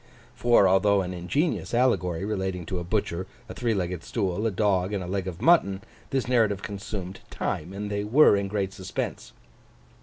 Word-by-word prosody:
For, 120 -5 +4
although 95 +1 +3
an 90 0 -5
ingenious 120 - -1
Allegory 95 -8 +1
relating 95 -4 -2
to 90 +2 -3
a - - -4
butcher, 95 -1 -2 0.2
a - - -7
three 115 -3 -1
legged 90 -2 -3
stool, 100 -1 -1
a - - +2
dog, 95 -1 +1
and 100 -2 -2
a - - -6
leg 95 0 -2
of 95 +3 -6
mutton, 100 - +4 0.3
this 135 -2 -1
narrative 110 -5 +2
consumed 100 -2 -6
time; 80 +4 -3
and 105 +1 -5
they 100 0 -1
were 120 +3 +6
in 100 0 -1
great 95 -1 -2
suspense. 95 0 -5
100 Hz, 180 wpm, -26 LUFS, 95-105 Hz, 0.3 s, were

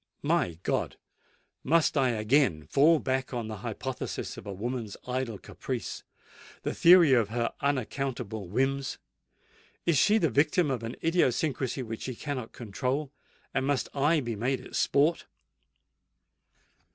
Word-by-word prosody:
"My 85 -2 +1
God! - - -1 0.7
must 160 +2 +3
I 135 -3 +3
again 110 - +2
fall 150 - +5
back 130 -2 -1
upon 120 -3 -3
the 110 - -5
hypothesis - - -5
of - - -10
a - - -4
woman's 115 +1 -4
idle 125 -3 -2
caprice—the - - -7
theory 170 -4 +7
of 115 -5 +3
her 115 +1 -1
unaccountable 125 -6 -2
whims? 135 +6 -1 0.9
Is 165 -5 +3
she 210 +8 +5
the 165 -9 +1
victim 150 +2 +2
of 125 -3 -2
an 115 +1 -5
idiosyncracy 145 -5 +1
which 115 -1 -6
she 130 - -4
cannot 130 -4 -5
control? 130 +6 -3 0.4
and 135 0 0
must 140 -3 0
I 150 +3 +2
be 120 -3 -3
made 125 +5 -1
its - - -4
sport?" 150 +4 +2
130 Hz, 135 wpm, -29 LUFS, 115-145 Hz, 0.9 s, theory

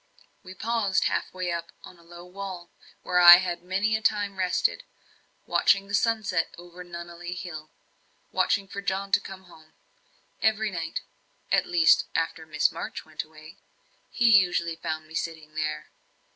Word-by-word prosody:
We 185 -1 -11
paused 215 -3 0
half - - -1
way 185 -1 -3
up 170 0 -4
on 175 - -13
a - - -18
low 175 +1 -13
wall, 185 -1 -8 0.3
where 180 -1 +1
I 175 0 +11
had 175 -2 -3
many 195 +5 0
a 220 - -2
time 205 -2 0
rested, 185 -1 0 0.6
watching 195 0 +3
the 200 - -9
sunset 205 -6 0
over 175 +1 -11
Nunneley 175 0 -8
Hill 155 -4 -8 0.6
watching 200 -1 +1
for 200 +1 -6
John 195 0 -2
to - - +5
come 190 0 -10
home. 160 -3 -18 0.7
Every 220 -1 +1
night 165 -3 -4 0.5
at - - +2
least 170 -2 +4
after 165 -1 -2
Miss 150 -1 +2
March - - -6
went 155 -1 -5
away 155 +1 -15 0.5
he 240 - +1
usually 175 -3 +2
found 160 -1 -5
me 160 - -15
sitting 160 -2 -5
there. 75 - -4
175 Hz, 160 wpm, -26 LUFS, 165-195 Hz, 0.7 s, I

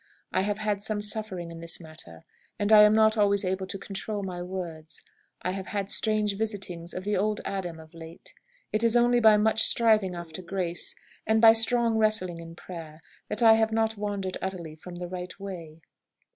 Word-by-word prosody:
I - - +1
have 205 +1 -1
had 210 -2 -2
some 215 0 -2
suffering 205 -5 -2
in 165 - -9
this 170 0 -3
matter, 155 - -12 0.3
and 205 +1 0
am 210 0 +8
not 220 0 +4
always 200 -1 +2
able 190 +1 -2
to 195 - -5
control 200 +1 -5
my 180 -2 -5
words. 175 -4 -7 0.4
I 180 - -1
have 190 0 -5
had 200 -1 -3
strange 215 -2 +1
visitings 190 -6 -4
of 185 - -4
the 205 +1 -1
old 210 +2 0
Adam 180 -4 -4
of 160 +1 -15
late. 165 0 -12 0.4
It 215 +2 0
is 230 0 +4
only 240 0 +4
by 220 -2 +6
much 220 +1 +2
striving 215 -6 +3
after 170 0 -7
grace, 175 -2 -3 0.3
and 220 0 +3
by 225 0 +8
strong 230 0 +3
wrestling 215 -6 +1
in 165 0 -10
prayer, 165 -3 -10 0.2
that - - -1
I 225 -1 +8
have 220 0 +2
not 220 0 0
wandered 200 -2 -3
utterly 175 -5 -5
from 175 +3 -11
the 175 0 -6
right 180 +1 -7
way." 170 -5 -8
195 Hz, 190 wpm, -27 LUFS, 175-215 Hz, 0.4 s, am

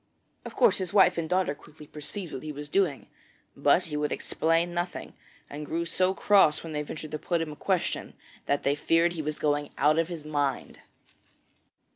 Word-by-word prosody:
Of - - -8
course, 480 - +4
his 185 -2 -4
wife 180 -3 +5
and 160 -1 -3
daughter 180 -5 +1
quickly 150 +1 -15
perceived 155 +5 -7
what 130 - -5
he 155 - -5
was 145 0 -8
doing, 175 -6 +1 0.5
but 180 - +3
he 155 -3 -5
would 150 0 -1
explain 165 +2 0
nothing, 175 +1 -4 0.3
and 145 +1 -7
grew 165 +3 -2
so 185 +2 +1
cross 195 -7 +4
when 165 -1 -7
they 150 - -1
ventured 150 +1 -7
to 155 - -3
put 170 +2 -1
him 165 -2 -3
a - - -8
question 185 +2 -2 0.3
that 140 - +1
they 140 - +2
feared 165 +3 +2
he 165 - -3
was 155 0 -3
going 145 -1 0
out 150 +3 +4
of 165 - +1
his 165 -4 -7
mind. 145 -2 -2
160 Hz, 195 wpm, -28 LUFS, 150-175 Hz, 0.5 s, wife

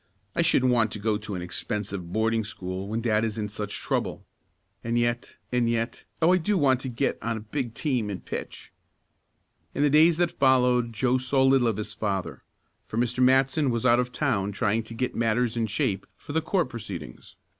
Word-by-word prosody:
"I - - +3
shouldn't 130 0 +3
want 115 -3 +2
to - - -4
go 105 0 0
to 105 -2 -6
an 90 - -4
expensive 95 0 -4
boarding 110 +2 +1
school 95 -2 -5
when 110 +2 -2
dad 110 -2 +1
is 110 -2 -2
in 105 -1 -2
such 105 -1 -4
trouble. - - -2 0.6
And 115 0 0
yet 120 0 -1
and 120 -2 +2
yet 115 +1 -2 0.2
Oh! 175 +3 +6
I - - +5
do 200 +4 +1
want 135 -5 +3
to 130 - -5
get 115 - -1
on 115 0 -2
a - - -6
big 115 +1 -4
team 125 -9 -1
and 95 -2 -6
pitch!" - - -7 1.0
In 145 - +1
the 145 - +3
days 160 +2 +6
that 175 -1 +2
followed 125 -3 +3
Joe 125 +3 +1
saw 130 +1 +2
little 135 -2 +4
of 110 -3 0
his 105 0 -5
father, 100 -4 -3 0.5
for 110 - -5
Mr. 120 +1 0
Matson 135 +3 +4
was 115 0 -1
out 120 -1 +5
of 125 0 -1
town 110 -8 0
trying 110 +1 0
to 115 - -9
get 125 +2 -2
matters 115 +1 +1
in 115 -1 0
shape 100 -2 -1
for 145 - -9
the 160 - +2
court 170 -2 0
proceedings. 95 - -8
115 Hz, 205 wpm, -26 LUFS, 105-130 Hz, 1.0 s, Oh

